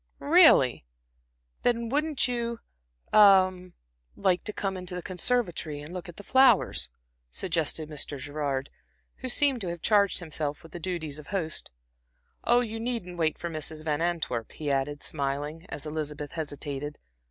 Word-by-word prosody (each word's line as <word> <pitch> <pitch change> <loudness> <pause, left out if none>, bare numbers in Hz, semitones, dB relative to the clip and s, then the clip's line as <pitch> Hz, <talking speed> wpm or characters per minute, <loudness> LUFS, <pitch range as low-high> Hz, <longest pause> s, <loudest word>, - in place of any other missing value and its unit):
"Really! 300 - +6 0.8
Then 235 -1 +1
wouldn't 295 +3 +1
you 235 -1 -2 0.5
a 195 -3 +8 0.6
like 185 -1 +1
to 210 - -1
come 195 -2 -2
into 180 0 -5
the 180 - -5
conservatory 180 -6 -1
and 150 +4 -9
look 180 0 -6
at 170 - -10
the 205 - -9
flowers?" 250 - +4 0.4
suggested 160 - -1
Mr. 150 -1 -3
Gerard, 140 0 -3 0.5
who 255 - -5
seemed 270 -1 +3
to 190 - -3
have 170 -1 -6
charged 205 -2 +4
himself 155 -4 -3
with 165 - -13
the 175 - -7
duties 160 -4 -4
of 150 - -12
host. 170 -6 -3 0.7
"Oh, 240 +1 +4
you 225 -2 -4
needn't 225 -7 -3
wait 155 -1 +1
for 170 - -4
Mrs. 155 0 -3
Van 150 0 0
Antwerp," 165 -9 -1
he 150 -2 -3
added, 140 +2 -1
smiling, 145 +4 -3
as 145 - -4
Elizabeth 150 -1 -4
hesitated. 145 -2 -5
170 Hz, 155 wpm, -28 LUFS, 150-210 Hz, 0.8 s, a